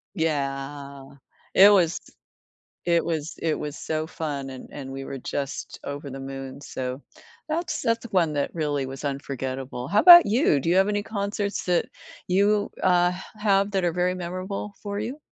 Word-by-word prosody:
Yeah, 140 -3 -3 0.5
it 200 +2 +9
was 175 -4 +3 0.8
it 170 -1 +2
was 160 -2 -3
it 160 -2 -1
was 150 0 -5
so 155 0 -2
fun 145 -5 -4
and, 130 -1 -9
and 135 -2 -7
we 135 0 -6
were 135 - -6
just 140 +2 -5
over 140 0 -5
the 135 +1 -7
moon, 135 0 -7
so 130 -1 -5 0.5
that's 310 0 -2
that's 230 +1 0
one 170 -5 +2
that 140 -1 -1
really 145 -4 -1
was 135 +2 -7
unforgettable. 135 -2 -4
How 205 - +3
'bout 345 -1 +11
you? 210 - +3
Do 165 - -2
you 175 - +3
have 195 +2 +4
any 205 0 0
concerts 200 -1 -3
that 175 -1 +2 0.4
you, 205 +3 +2
uh, 180 -1 +4
h 190 - -8 0.2
have 200 -1 +3
that 190 -3 0
are 170 - +1
very 180 +1 +1
memorable 185 +3 -5
for 205 0 -3
you? 250 +8 -4
165 Hz, 170 wpm, -25 LUFS, 140-200 Hz, 0.8 s, bout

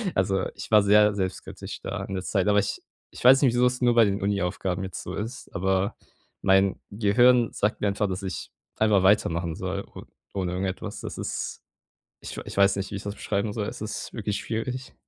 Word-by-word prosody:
Also, 95 0 +1
ich - - -8
war 105 -1 +7
sehr 105 +1 +5
selbstkritisch 95 -2 -5
da - - -4
in 95 - -5
der 95 - -3
Zeit, 95 -1 0
aber 105 0 +4
ich 100 - -2 0.3
ich - - -10
weiß 130 +2 +8
nicht 125 -4 +4
wieso's 125 +1 +2
nur 120 -1 +4
bei 115 -1 +7
den 100 0 -1
Uni 100 0 +1
Aufgaben 90 0 -2
jetzt 95 -2 -6
so - - -6
ist, 115 +5 -6
aber 95 +3 0 0.5
mein 95 0 +3
Gehirn 115 +4 +4
sagt 105 +1 0
mir 105 - +2
einfach, 100 +1 0
dass 95 +1 -4
ich 95 - -5 0.3
einfach 105 -3 +3
weitermachen 85 -4 +2
soll - - -3
o - - -11 0.3
ohne 90 -2 -2
irgendetwas. 95 0 -4
Das - - -6
ist. - - -4 0.6
Ich - - -7
ich - - -8
weiß 100 0 +5
nicht, 95 - -4
wie - - -4
ich 100 - -6
das 100 0 -5
beschreiben 100 +1 -2
soll. 105 -2 -2
Es - - -6
ist 110 0 -5
wirklich 105 -2 -2
schwierig. 125 +3 -4
100 Hz, 205 wpm, -26 LUFS, 95-110 Hz, 0.6 s, weiß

